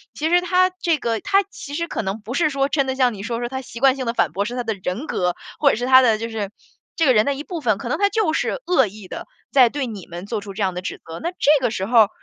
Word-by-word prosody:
其 310 - -1
实 350 +1 +4
他 365 +1 +3
这 335 -2 +2
个 230 -5 -1
他 395 - +2
其 285 -7 -9
实 335 +2 -2
可 - - -3
能 195 +1 -3
不 220 +3 -7
是 310 +2 +2
说， 275 -1 0
真 280 -2 0
的 265 - -1
像 255 -2 +2
你 200 - -8
说 230 +2 -3
的， 240 - -2
他 265 0 -4
习 240 -2 -10
惯 265 0 +5
性 260 -2 -4
的 230 - 0
反 155 - +2
驳 200 +4 -1
是 240 +3 -4
他 245 - -2
的 225 -1 -1
人 195 +11 -3
格， 180 - -1 0.2
或 285 - +5
者 - - +2
是 240 +3 -3
他 260 0 +7
的 230 -4 +3
就 225 +1 -4
是 215 -3 -4 0.5
这 330 - +2
个 260 - +5
人 215 -2 +5
的 280 +3 0
一 290 - -6
部 345 -2 -6
分， 220 -7 +1
可 235 - -6
能 - - -1
他 405 - +3
就 415 -7 +1
是 - - -1
恶 265 -10 +3
意 205 0 -11
地， - - -7 0.2
在 255 -4 +6
对 285 +2 -3
你 210 -7 -8
们 175 +2 -8
做 210 0 -3
出 200 -1 -9
这 205 - -1
样 190 -1 0
的 180 - -5
指 185 - -5
责。 165 - -8
那 335 - -2
这 295 -4 +3
个 245 - +3
时 190 -3 -3
候 235 +2 +4
儿， - - -13
245 Hz, 345 characters per minute, -21 LUFS, 215-290 Hz, 0.5 s, 他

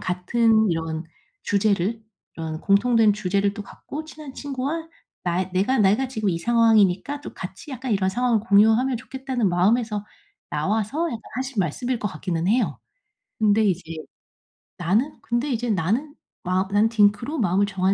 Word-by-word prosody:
같은 220 +3 +2
이런 160 0 -3 0.4
주제를 205 +2 +1 0.3
이런 160 -1 -5
공통된 220 +1 +4
주제를 200 0 0
또 205 - -6
갖고 300 +9 -8
친한 305 -3 -11
친구와 285 +4 -4 0.4
나의 180 +1 -1
내가 205 +8 +1
내가 210 +6 +3
지금 220 -5 -2
이 165 - -1
상황이니까 225 +4 +3
또 - - -9
같이 190 +9 -8
약간 260 -1 -5
이런 190 -2 +1
상황을 240 +2 +1
공유하면 225 +4 +4
좋겠다는 260 -3 -2
마음에서 210 +4 +1 0.5
나와서 215 - -1
약간 230 -8 -4
하신 260 -1 -4
말씀일 235 - -1
것 210 - -2
같기는 175 -3 -3
해요. 240 +5 +1 0.6
근데 215 0 +3
이제 185 -2 +1 1.0
나는 210 - 0
근데 245 +4 -1
이제 240 0 -1
나는 220 - 0 0.3
마 185 +1 0
나는 210 +2 +3
딩크로 230 +7 +2
마음을 195 0 +2
정한 190 -1 +1
215 Hz, 330 characters per minute, -23 LUFS, 190-250 Hz, 1.0 s, 공통된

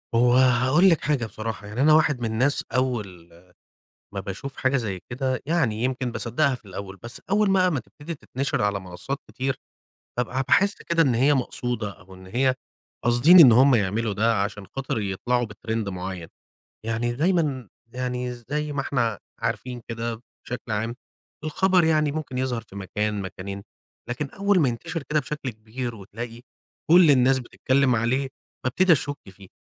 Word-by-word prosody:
هو 120 +1 +4
هاقول 130 +8 +5
لِك 165 - +3
حاجة 140 -6 0
بصراحة، 110 -1 -6
يعني 110 +6 -3
أنا 155 +1 +6
واحد 150 -4 +4
من 120 - -2
الناس 130 +6 +1
أول 105 -10 -2 0.9
ما 100 - -2
باشوف 100 +8 -6
حاجة 135 +1 +1
زي 100 -7 -3
كده 130 0 -1
يعني 125 -10 +1
يمكن 130 -2 -1
باصدَّقها 130 +5 +1
في 120 - -11
الأول، 95 0 -7
بس 120 - -7
أول 205 -1 +3
بقى 185 -1 +4
ما 145 -6 -1
تبتدي 150 +8 -9
تتنشر 135 -4 -3
على 100 -1 0
منصات 95 +10 -5
كتير، 135 0 -2 0.6
بابقى 125 +2 0
باحِس 200 +1 +4
كده 165 -1 +1
إن 130 -5 +2
هي 140 +5 +4
مقصودة 120 -4 -2
أو 95 0 -15
إن 95 0 -13
هي، 130 +5 +1 0.5
قاصدين 120 +10 +7
إن 130 -8 +10
هُم 130 +3 +6
يعملوا 105 +1 +1
ده 110 0 +2
عشان 100 -1 -4
خاطر 135 +2 -3
يطلعوا 120 +5 0
بTrend 110 0 -4
معيّن، 90 -2 -5 0.6
يعني 115 +1 -1
دايمًا 145 - 0 0.2
يعني 125 0 -3
زي 145 +5 -4
ما 140 - -1
إحنا 120 -6 0 0.2
عارفين 125 -2 -3
كده 115 0 -4 0.3
بشكل 120 -2 -5
عام، 110 +3 -1 0.5
الخبر 180 +3 +3
يعني 155 -2 +2
ممكن 145 -5 -4
يظهر 125 -3 -1
في 100 - -14
مكان 105 +1 -2
مكانين، 100 +1 -6 0.5
لكن 135 +3 -3
أول 200 -1 +2
ما 135 - +3
ينتشر 160 +7 -4
كده 150 +2 0
بشكل 145 -4 -5
كبير 115 +2 -6
وتلاقي 115 +4 -8 0.5
كُلّ 175 -3 +8
الناس 130 0 +5
بتتكلّم 130 0 +1
عليه، 130 +4 0 0.4
بابتدي 170 +8 +3
أشُكّ 145 -1 +1
فيه، 95 0 -14
125 Hz, 165 wpm, -25 LUFS, 110-140 Hz, 0.9 s, إن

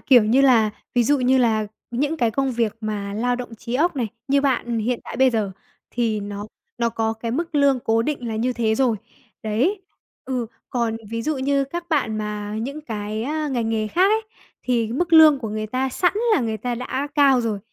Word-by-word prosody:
kiểu 245 -5 +5
như 240 +5 +3
là, 240 -6 +5 0.2
ví 245 - +4
dụ 290 +4 +3
như 260 +1 +3
là 220 -3 +2 0.2
những 285 +6 -1
cái 235 -6 +1
công 270 +3 0
việc 230 -3 -1
mà 205 -2 -4
lao 245 +3 0
động 245 -2 -7
trí 235 +2 -6
óc 320 +3 +2
này, 240 -4 -1 0.2
như 280 +1 +3
bạn 240 -4 0
hiện 235 +2 -1
tại - - -7
bây 260 +1 +5
giờ 215 -4 -1 0.4
thì 225 -3 0
nó 205 0 -6 0.3
nó 235 -1 +2
có 225 -1 -1
cái 225 +1 -5
mức 325 +6 -3
lương 280 -2 +4
cố 225 0 +1
định 250 -2 -3
là 220 - -3
như 245 +3 0
thế 225 -2 +1
rồi. 245 -3 +2 0.5
Đấy, 265 - 0 0.4
ừ, 250 -3 -2 0.2
còn 235 -3 0
ví 230 0 -3
dụ 310 +4 -1
như 275 +1 +1
các 340 +5 -6
bạn 270 -9 0
mà 210 0 -4
những 280 +5 -5
cái, 215 -5 -4
a, 305 +4 -2
ngành 240 -5 -1
nghề 220 -1 0
khác 370 - +3
ấy 445 - +1 0.4
thì 230 -3 0
mức 335 +6 -1
lương 315 -3 +8
của 230 -4 -5
người 215 0 -3
ta 255 +4 -1
sẵn 355 +7 +1 0.2
là - - +2
người 225 -2 -1
ta 245 +2 -3
đã 260 +3 -3
cao 275 -4 +5
rồi, 225 -3 -2
240 Hz, 220 wpm, -22 LUFS, 220-275 Hz, 0.5 s, lương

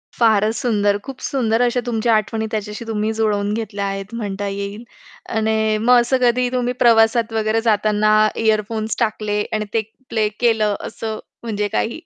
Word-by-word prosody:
फारच 220 -1 +3
सुंदर, 205 -3 +1
खूप 270 -1 -8
सुंदर 235 -3 0
अशा 245 0 +2
तुमच्या 230 -1 +1
आठवणी 220 +1 -1
त्याच्याशी 210 +1 -4
तुम्ही 215 0 -1
जुळवून 210 -2 0
घेतल्या 205 -3 -3
आहेत 195 +2 -5
म्हणता 205 -2 -3
येईल. 200 +3 -5 0.5
आणि 220 -1 +1
मग 245 +3 +5
असं 255 +2 +1
कधी 245 0 +2
तुम्ही 250 -1 0
प्रवासात 225 0 +4
वगैरे 220 0 +1
जाताना 215 -1 +2 0.2
इअरफोन्स 220 0 0
टाकले 215 -2 0
आणि 215 0 -1
ते 225 - +2 0.3
प्ले 220 -2 +1
केलं 220 -4 +2
असं 220 -1 -5 0.2
म्हणजे 210 -2 -2
काही 225 +7 -2
220 Hz, 155 wpm, -20 LUFS, 210-230 Hz, 0.5 s, मग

